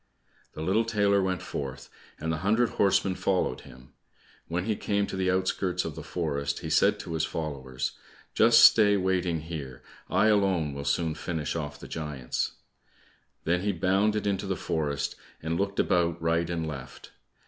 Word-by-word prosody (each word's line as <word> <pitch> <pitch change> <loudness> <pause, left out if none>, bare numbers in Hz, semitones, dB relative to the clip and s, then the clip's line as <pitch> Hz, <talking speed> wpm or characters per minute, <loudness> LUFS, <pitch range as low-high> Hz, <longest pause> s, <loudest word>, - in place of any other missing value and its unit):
The 80 - -5
little 100 +7 +2
tailor 100 -3 +2
went 95 -1 -1
forth, 70 -1 -5 0.3
and 80 - -2
the - - -1
hundred 110 +7 +2
horsemen 95 -1 +2
followed 90 -9 0
him. 65 +1 -15 0.5
When 85 +2 -2
he 110 -1 0
came 100 0 0
to - - -6
the 95 -1 0
outskirts 90 -1 0
of - - -4
the - - -7
forest, 70 -4 -2
he - - -5
said - - +4
to 85 - -6
his 80 - 0
followers, 65 -5 -3 0.4
"Just 115 0 +6
stay 105 -2 +7
waiting 90 -3 0
here, 70 -6 -7 0.3
I - - +3
alone 95 -8 +2
will 70 0 -6
soon 80 +3 +1
finish 80 -2 -3
off 75 -3 -4
the - - -9
giants." 75 -6 -3 0.9
Then 85 +2 +1
he 100 +1 0
bounded 100 +5 +1
into 100 -1 -1
the 95 - 0
forest 70 -3 -2 0.3
and 80 +1 -1
looked 100 0 -1
about 85 -1 +2
right 85 +1 +1
and 85 -2 -2
left. 70 -4 -8
85 Hz, 170 wpm, -28 LUFS, 75-95 Hz, 0.9 s, stay